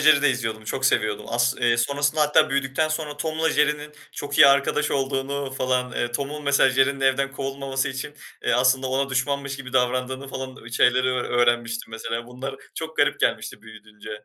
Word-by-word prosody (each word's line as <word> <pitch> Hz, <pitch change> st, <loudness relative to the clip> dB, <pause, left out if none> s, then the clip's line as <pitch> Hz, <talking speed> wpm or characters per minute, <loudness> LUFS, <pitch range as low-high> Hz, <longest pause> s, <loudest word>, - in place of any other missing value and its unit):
Jerry'i 150 Hz, -2 st, +5 dB
de 145 Hz, -, +5 dB
izliyordum. 115 Hz, -4 st, -3 dB
Çok 130 Hz, +5 st, -3 dB
seviyordum. 105 Hz, -5 st, 0 dB
As 120 Hz, +1 st, +1 dB
eee, 120 Hz, -1 st, +3 dB
sonrasında 145 Hz, +5 st, 0 dB
hatta 150 Hz, +1 st, +4 dB
büyüdükten 135 Hz, +3 st, 0 dB
sonra 155 Hz, -2 st, -3 dB
Tom'la 160 Hz, +1 st, -1 dB
Jerry'nin 150 Hz, 0 st, 0 dB, 0.2 s
çok 145 Hz, 0 st, -5 dB
iyi -, -, +10 dB
arkadaş 140 Hz, +2 st, +2 dB
olduğunu 135 Hz, 0 st, -2 dB
falan, 125 Hz, -1 st, -1 dB
eee, 120 Hz, 0 st, -2 dB
Tom'un 145 Hz, +3 st, -4 dB
mesela 140 Hz, -1 st, +4 dB
Jerry'nin 135 Hz, +1 st, +2 dB
evden 135 Hz, +1 st, +1 dB
kovulmaması 135 Hz, 0 st, -3 dB
için, 135 Hz, +2 st, -6 dB, 0.3 s
eee, -, -, +2 dB
aslında 130 Hz, +1 st, +3 dB
ona 135 Hz, +1 st, -1 dB
düşmanmış 140 Hz, +1 st, -1 dB
gibi 130 Hz, -2 st, -9 dB
davrandığını 130 Hz, +1 st, 0 dB
falan, 130 Hz, 0 st, -6 dB
eee, 120 Hz, -, -10 dB
şeyleri 125 Hz, +2 st, +3 dB
ö 130 Hz, 0 st, 0 dB
öğrenmiştim 120 Hz, -1 st, 0 dB
mesela. 115 Hz, +1 st, -4 dB
Bunlar 135 Hz, +2 st, -7 dB, 0.2 s
çok 160 Hz, 0 st, -6 dB
garip -, -, +2 dB
gelmişti -, -, -1 dB
büyüyünce 110 Hz, -1 st, -13 dB
135 Hz, 175 wpm, -24 LUFS, 125-140 Hz, 0.3 s, iyi